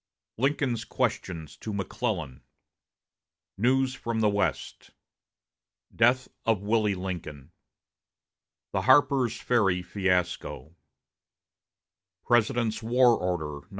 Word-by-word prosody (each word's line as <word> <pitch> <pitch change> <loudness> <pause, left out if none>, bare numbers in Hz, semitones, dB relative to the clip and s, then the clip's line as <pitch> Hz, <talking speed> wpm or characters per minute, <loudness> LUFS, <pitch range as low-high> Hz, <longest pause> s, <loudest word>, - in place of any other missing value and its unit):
1 130 +5 +3
Lincoln's 135 -5 -2
Questions 80 -5 -3
to 110 - -6
McClellan 95 - -3 1.1
News 130 +4 +2
from 115 -3 -3
the 110 -1 +3
West 100 0 -2 1.1
Death 125 +3 +3 0.2
of 110 -3 +1
Willie 105 -1 +1
Lincoln 85 -6 -6 1.2
The - - -1
Harper's 130 -5 +3
Ferry 95 -7 +1
Fiasco 90 -7 -2 1.5
President's 120 -1 +1
War 120 +1 +4
Order 80 -5 -4
No. - - -35
105 Hz, 90 wpm, -27 LUFS, 90-120 Hz, 1.5 s, War